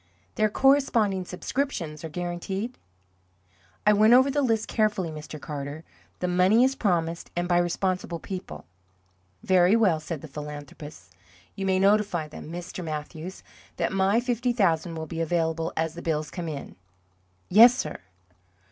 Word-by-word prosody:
"Their 215 - +2
corresponding 230 -7 +2
subscriptions 180 - -3
are 160 - -5
guaranteed?" 180 +8 -4 1.1
"I 210 - +6
went 215 +3 +5
over 260 +2 +5
the 290 +1 +1
list 225 -4 +1
carefully, 210 -6 0
Mr. 155 0 -8
Carter. 145 +1 -6 0.4
The 180 - 0
money 185 +6 +4
is 265 +1 +3
promised, 170 -9 -1
and 175 0 -1
by 175 -1 +3
responsible 175 0 -1
people." 165 - -7 0.8
"Very 185 +2 +4
well," 195 -9 +3
said 155 -1 -6
the 160 - -8
philanthropist. 145 - -9 0.4
"You 195 -1 -3
may 190 0 +2
notify 195 -4 +2
them, 150 +1 -10
Mr. 175 +1 -6
Mathews, 160 +3 -6 0.3
that - - -1
my 195 +3 +3
fifty 245 0 0
thousand 170 -6 +1
will 160 0 -4
be 165 +1 -4
available 165 0 0
as 160 0 0
the 170 - -8
bills 155 -2 -2
come 170 -2 -5
in." 140 -9 -7 0.7
"Yes, 235 +6 +8
sir." - - -4
180 Hz, 145 wpm, -26 LUFS, 160-210 Hz, 1.1 s, Yes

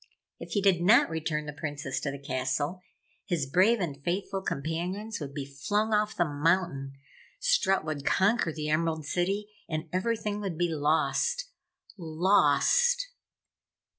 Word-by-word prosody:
If - - -8
he 205 - +1
did 190 -4 +4
not 205 +1 +5
return 155 -1 -2
the 150 - -6
Princess 145 -2 -4
to 140 - -3
the 140 - -5
castle, 140 +5 -2 0.5
his 165 -6 0
brave 190 - +3
and 145 -6 -4
faithful 190 +3 -2
companions 180 +8 -3
would 145 -3 -6
be 140 -2 -3
flung 205 +11 -1
off 210 0 +1
the 175 - +3
mountain, 145 -2 0 0.5
Strut - - +2
would 150 -3 -3
conquer 190 +1 +2
the 150 -1 -4
Emerald 160 0 0
City 195 +6 -1 0.2
and 155 0 -3
everything 210 +1 -1
would 195 -6 -4
be 175 0 +1
lost. 160 - +1 0.5
LOST! 190 - +3
170 Hz, 140 wpm, -28 LUFS, 150-205 Hz, 0.5 s, not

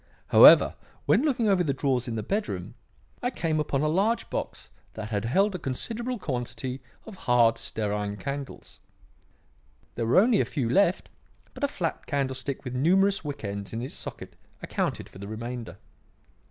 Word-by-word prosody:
However, - - +8 0.3
when - - +4
looking 260 -7 +1
over 190 -3 +3
the 140 -5 -1
drawers 130 -2 0
in 115 - -3
the 110 - -3
bedroom, 205 - -3 0.5
I 245 - 0
came 160 -10 -1
upon 145 -2 0
a - - +2
large 205 +9 +1
box - - -5 0.2
that 110 0 -6
had 105 +1 -1
held 195 - +2
a 180 - -4
considerable 230 - -3
quantity 125 - -4 0.2
of 220 - -10
hard 120 -2 +4
stearine 105 -1 -2
candles. 140 +2 -7 1.1
There 115 -1 -2
were 120 - +3
only 215 +2 +5
a - - 0
few 135 -6 -2
left, 180 +8 +2 0.4
but - - -9
a - - +4
flat 175 -11 -4
candlestick 135 -1 -2
with 125 -2 -5
numerous 190 +9 +3
wick 145 -4 -6
ends 100 0 -5
in 115 - -3
its 130 - -6
socket - - -7 0.3
accounted - - -2
for 95 - -14
the 100 - -7
remainder. 115 +2 -6
140 Hz, 165 wpm, -27 LUFS, 115-195 Hz, 1.1 s, However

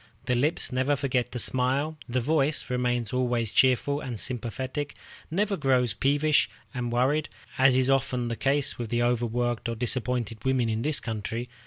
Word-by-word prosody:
The 125 - +1
lips 140 +7 +1
never 130 +3 +1
forget 125 -3 -1
to - - -4
smile; 130 +6 0
the 125 +1 +1
voice 145 0 +1
remains 120 -2 0
always 120 -3 0
cheerful 130 +3 +3
and 120 -7 -5
sympathetic, 130 +5 -3 0.3
never 200 +5 0
grows 130 - +2
peevish 145 +7 +2 0.2
and 125 -2 -3
worried, 135 +6 +1 0.3
as 130 -1 +6
is 130 0 +3
too 135 - +4
often 125 -2 0
the 115 - -2
case 140 +2 0
with 115 -3 -4
overworked 120 0 0
or 115 - -2
disappointed 115 -2 -2
women 130 -3 +1
in 110 0 -1
this 150 +3 +1
country. 115 +2 -4
125 Hz, 165 wpm, -27 LUFS, 120-135 Hz, 0.3 s, as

